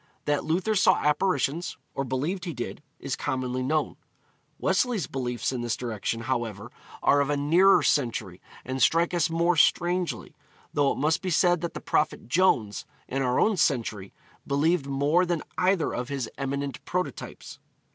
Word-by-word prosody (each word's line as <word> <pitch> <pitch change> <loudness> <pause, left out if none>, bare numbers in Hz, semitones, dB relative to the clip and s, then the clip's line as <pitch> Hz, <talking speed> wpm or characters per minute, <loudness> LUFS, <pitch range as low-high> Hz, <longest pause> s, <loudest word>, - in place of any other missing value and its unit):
That 145 0 +1
Luther 180 +7 0
saw 205 -1 +5
apparitions, 165 +1 0 0.2
or 135 - -2
believed 145 +9 -2
he 170 -5 -5
did, 120 - -5 0.2
is - - -4
commonly 130 0 -2
known. 150 +4 -1 0.6
Wesley's 235 - +1
beliefs 125 -3 -3
in 125 -2 -3
this 120 -1 -2
direction, 115 -1 -3
however, 115 -2 -3 0.3
are 145 - +4
of 140 - 0
a 145 - +1
nearer 170 +7 +5
century, 115 -9 0 0.2
and 130 +1 -3
strike 170 +7 +3
us 170 -2 +2
more 170 +1 +2
strangely; 175 +3 +1 0.4
though 145 -2 +3
it - - -3
must 155 +3 +1
be 190 - -3
said 175 0 +3
that 170 - -4
the - - -5
Prophet 150 -5 0
Jones, 120 - +2 0.2
in 135 +1 -2
our 125 -1 +1
own 215 -3 +3
century, 115 - 0 0.4
believed 145 +2 +1
more 145 +6 +2
than 175 -3 -1 0.2
either 185 -2 +2
of 125 +2 -4
his 135 -4 -3
eminent 140 -1 -4
prototypes. 180 0 -5
145 Hz, 160 wpm, -26 LUFS, 125-175 Hz, 0.6 s, saw